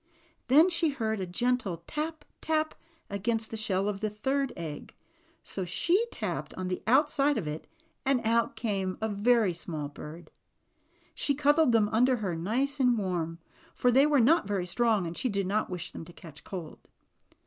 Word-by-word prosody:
Then 295 +7 +7
she 335 -2 +3
heard 220 -6 -2
a 185 - -3
gentle 200 -4 -1
tap, 310 0 -4 0.2
tap 315 0 0 0.3
against 220 +2 -2
the - - -4
shell 200 -3 0
of 205 -1 -2
the 215 0 -1
third 265 +6 -1
egg; 155 -4 -7 0.5
so 190 - -5
she 345 - +1
tapped - - -4
on 185 -1 -4
the 180 - -3
outside 290 +2 +4
of 200 - -2
it, 150 +1 -5 0.4
and 270 -2 +2
out 230 +1 +2
came 195 -5 -2
a 220 - -1
very 215 -1 +2
small 155 -4 -4
bird. 155 +3 -10 0.8
She 285 - 0
cud 290 +2 +3
dled 315 -6 +5
them 225 -3 +4
under 250 +4 +3
her, 200 -7 -3
nice 255 - -1
and 250 -3 +4
warm, 175 -5 -2 0.4
for 250 - +3
they 270 +4 +5
were 295 -2 +4
not 280 - +4
very 195 -3 -1
strong 215 +1 +2
and 165 0 -5
she 255 - -1
did 200 -2 -1
not 210 +3 0
wish 180 -2 -4
them - - -8
to 175 - -13
catch 155 -4 -12
cold. 175 -5 -8
220 Hz, 180 wpm, -29 LUFS, 185-270 Hz, 0.8 s, Then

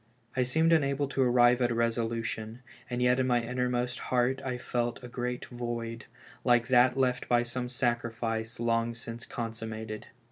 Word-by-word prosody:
I 130 - +2
seemed 160 +7 +3
unable 140 -2 +2
to 135 - 0
arrive 125 0 +5
at 120 - +3
a 120 - -1
resolution, 115 0 -1 0.3
and 125 0 -1
yet 125 +1 +4
in 130 - +2
my 120 -1 +3
innermost 125 0 -1
heart 130 +1 +2
I 130 -2 -2
felt 120 -1 -2
a - - -6
great 125 0 -3
void, 120 -1 -5 0.4
like 120 -1 +3
that 125 0 +5
left 125 -2 +1
by 120 0 +4
some 125 +1 -4
sacrifice 115 -2 -2
long 115 0 +1
since 115 0 -8
consummated. 110 -2 -5
120 Hz, 165 wpm, -30 LUFS, 115-125 Hz, 0.4 s, arrive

